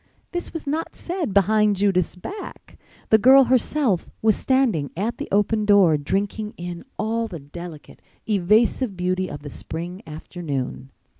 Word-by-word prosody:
This 350 Hz, 0 st, -4 dB
was 325 Hz, -, -6 dB
not 305 Hz, +3 st, -3 dB
said 350 Hz, -, -3 dB
behind 210 Hz, +1 st, +3 dB
Judith's 190 Hz, -3 st, +1 dB
back. 390 Hz, -, -9 dB, 0.3 s
The 220 Hz, -, +7 dB
girl 265 Hz, +4 st, +8 dB
herself 255 Hz, -, +1 dB
was 220 Hz, -1 st, +4 dB
standing 245 Hz, -, +1 dB
at 220 Hz, +6 st, -2 dB
the 290 Hz, -, -4 dB
open 210 Hz, +2 st, +2 dB
door, 200 Hz, -6 st, +5 dB
drinking 200 Hz, +8 st, -2 dB
in 175 Hz, 0 st, -6 dB
all 225 Hz, +1 st, -1 dB
the 180 Hz, -6 st, -7 dB
delicate, 155 Hz, +2 st, -10 dB, 0.3 s
evasive 210 Hz, +2 st, +2 dB
beauty 185 Hz, +1 st, -1 dB
of 145 Hz, 0 st, -8 dB
the 145 Hz, -, -6 dB
spring 175 Hz, +4 st, -6 dB
afternoon. 150 Hz, -5 st, -5 dB
200 Hz, 145 wpm, -23 LUFS, 175-230 Hz, 0.3 s, girl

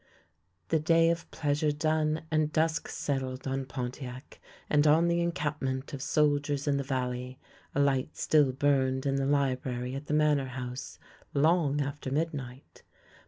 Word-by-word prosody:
The 160 Hz, -, +3 dB
day 165 Hz, +2 st, +4 dB
of 170 Hz, -1 st, -4 dB
pleasure 150 Hz, 0 st, 0 dB
done 155 Hz, +1 st, 0 dB
and 155 Hz, -1 st, +2 dB
dusk 160 Hz, +1 st, +1 dB
settled 130 Hz, -2 st, -3 dB
on 135 Hz, 0 st, -2 dB
Pon 125 Hz, -1 st, -4 dB
tiac 130 Hz, 0 st, -9 dB, 0.3 s
and 150 Hz, 0 st, +3 dB
on 160 Hz, +3 st, +5 dB
the 170 Hz, 0 st, +2 dB
encampment 145 Hz, -5 st, -2 dB
of 135 Hz, -, -5 dB
soldiers 145 Hz, -1 st, +1 dB
in 140 Hz, -1 st, +2 dB
the 140 Hz, -, -1 dB
valley, 125 Hz, -1 st, -3 dB, 0.4 s
a -, -, +1 dB
light 140 Hz, 0 st, +1 dB
still 150 Hz, -4 st, +3 dB
burned 130 Hz, -1 st, +1 dB
in 135 Hz, 0 st, +1 dB
the 135 Hz, 0 st, 0 dB
library 130 Hz, -3 st, 0 dB
at 140 Hz, +2 st, -6 dB
the 150 Hz, -, 0 dB
Manor 150 Hz, -3 st, +3 dB
House 125 Hz, 0 st, -6 dB, 0.4 s
long 150 Hz, -1 st, +3 dB
after 145 Hz, -1 st, -4 dB
midnight. 140 Hz, -3 st, -4 dB
145 Hz, 155 wpm, -29 LUFS, 130-155 Hz, 0.4 s, on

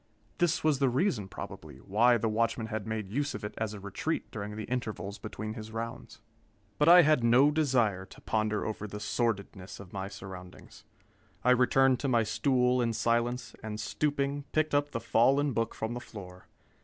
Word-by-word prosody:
This 175 Hz, -3 st, +1 dB
was 155 Hz, -3 st, +2 dB
the 135 Hz, -2 st, +3 dB
reason, 125 Hz, -, 0 dB
probably, 75 Hz, -6 st, -9 dB
why 115 Hz, -, +3 dB
the 115 Hz, -, -1 dB
watchman 115 Hz, +1 st, 0 dB
had 110 Hz, -1 st, -4 dB
made 110 Hz, -3 st, -4 dB
use 145 Hz, +5 st, -1 dB
of -, -, -7 dB
it 105 Hz, -, -5 dB
as 110 Hz, -1 st, -2 dB
a -, -, -8 dB
retreat 100 Hz, -, -3 dB
during 105 Hz, -1 st, -5 dB
the 110 Hz, -, -5 dB
intervals 110 Hz, -5 st, -4 dB
between 110 Hz, 0 st, -6 dB
his 110 Hz, 0 st, -8 dB
rounds. 115 Hz, +2 st, -6 dB, 0.6 s
But 150 Hz, +2 st, +5 dB
I 175 Hz, 0 st, +9 dB
had 150 Hz, -5 st, +3 dB
no 125 Hz, +5 st, +5 dB
desire 120 Hz, -11 st, +1 dB
to -, -, -15 dB
ponder 110 Hz, -1 st, -1 dB
over 105 Hz, -1 st, -4 dB
the 105 Hz, +1 st, -7 dB
sordidness 105 Hz, -3 st, -2 dB
of 95 Hz, -3 st, -12 dB
my 95 Hz, -1 st, -4 dB
surroundings. 95 Hz, -2 st, -11 dB, 0.6 s
I 125 Hz, -, +4 dB
returned 130 Hz, +1 st, +4 dB
to 140 Hz, -, -2 dB
my 120 Hz, -3 st, +3 dB
stool 125 Hz, +2 st, +2 dB
in 115 Hz, -1 st, 0 dB
silence, 115 Hz, +2 st, 0 dB
and 110 Hz, -1 st, -5 dB
stooping, 140 Hz, +4 st, -1 dB
picked 155 Hz, -1 st, +1 dB
up 145 Hz, 0 st, +2 dB
the 115 Hz, -, -3 dB
fallen 135 Hz, +5 st, +3 dB
book 115 Hz, 0 st, -1 dB
from 110 Hz, +1 st, -3 dB
the 120 Hz, -, -4 dB
floor. 90 Hz, -6 st, -11 dB
115 Hz, 185 wpm, -30 LUFS, 105-130 Hz, 0.6 s, I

